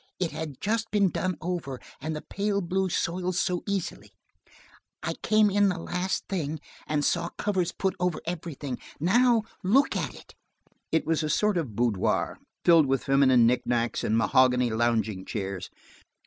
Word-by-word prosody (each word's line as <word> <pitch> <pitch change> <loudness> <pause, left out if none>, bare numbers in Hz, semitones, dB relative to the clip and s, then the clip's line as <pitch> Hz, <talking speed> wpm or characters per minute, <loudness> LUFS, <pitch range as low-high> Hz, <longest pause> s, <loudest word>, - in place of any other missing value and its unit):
It 180 -3 0
had 155 -4 -6
just 225 +2 -1
been 200 -4 +2
done 185 -2 -1
over, 160 -7 -3 0.2
and 155 0 -3
the 150 - -6
pale 200 0 -1
blue 190 +1 0
soils 180 +1 -1
so 180 -2 0
easily. 195 -3 -3 0.9
I - - -1
came 215 -1 +4
in 205 0 +4
the 180 - -2
last 180 +2 -2
thing, 160 -5 -2 0.3
and 150 -1 0
saw 170 0 +1
covers 185 -4 0
put 190 -1 -1
over 180 -2 0
everything. 155 -6 -5 0.2
Now 230 - +4 0.2
look 245 +9 +3
at - - -2
it!" - - -14 0.6
It 160 - +1
was 160 0 +1
a 155 - -2
sort 210 +5 +2
of 140 - -2
boudoir, 115 -5 0 0.3
filled 165 -4 +6
with 135 0 0
feminine 135 -3 +5
knickknacks 120 -1 +1
and 110 - +1
mahogany 125 0 +3
lounging 110 -4 0
chairs. 95 -2 -4
165 Hz, 160 wpm, -27 LUFS, 130-190 Hz, 0.9 s, filled